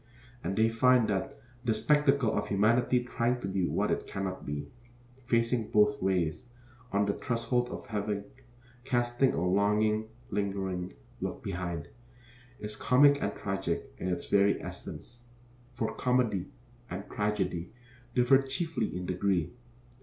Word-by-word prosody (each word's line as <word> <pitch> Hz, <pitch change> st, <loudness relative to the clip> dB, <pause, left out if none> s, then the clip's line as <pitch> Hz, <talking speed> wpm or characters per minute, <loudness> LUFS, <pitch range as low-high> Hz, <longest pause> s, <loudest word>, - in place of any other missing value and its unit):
And 95 Hz, +3 st, -2 dB
they 110 Hz, +1 st, +5 dB
find 120 Hz, +1 st, +4 dB
that 95 Hz, -2 st, -2 dB, 0.3 s
the 115 Hz, -3 st, +1 dB
spectacle 140 Hz, -2 st, +3 dB
of 105 Hz, 0 st, -1 dB
humanity 120 Hz, +5 st, +3 dB
trying 125 Hz, 0 st, 0 dB
to -, -, -3 dB
be 95 Hz, -2 st, 0 dB
what -, -, 0 dB
it -, -, -1 dB
cannot 95 Hz, -1 st, -4 dB
be, 75 Hz, 0 st, -3 dB, 0.6 s
facing 115 Hz, -1 st, +1 dB
both 110 Hz, +7 st, +3 dB
ways, 95 Hz, +3 st, 0 dB, 0.4 s
on 100 Hz, 0 st, +2 dB
the 100 Hz, -, +1 dB
threshold 120 Hz, +1 st, -1 dB
of -, -, -7 dB
heaven 105 Hz, -1 st, -2 dB, 0.6 s
casting 120 Hz, +1 st, +2 dB
a 85 Hz, -, 0 dB
longing, 105 Hz, +3 st, +2 dB, 0.2 s
lingering 95 Hz, -2 st, -2 dB, 0.2 s
look -, -, -4 dB
behind, 85 Hz, -4 st, -4 dB, 0.7 s
is 105 Hz, 0 st, -6 dB
comic 140 Hz, +5 st, +5 dB
and 100 Hz, -, -1 dB
tragic 95 Hz, -9 st, -3 dB
in -, -, -3 dB
its 90 Hz, -1 st, -2 dB
very 100 Hz, 0 st, +4 dB
essence; 120 Hz, 0 st, -9 dB, 0.5 s
for 115 Hz, -2 st, -1 dB
comedy 125 Hz, -7 st, +1 dB, 0.4 s
and 95 Hz, +3 st, -5 dB
tragedy 95 Hz, -4 st, -1 dB, 0.4 s
differ 125 Hz, +2 st, +5 dB
chiefly 135 Hz, -, -2 dB
in 90 Hz, -, -4 dB
degree. 90 Hz, -1 st, 0 dB
105 Hz, 135 wpm, -30 LUFS, 95-120 Hz, 0.7 s, they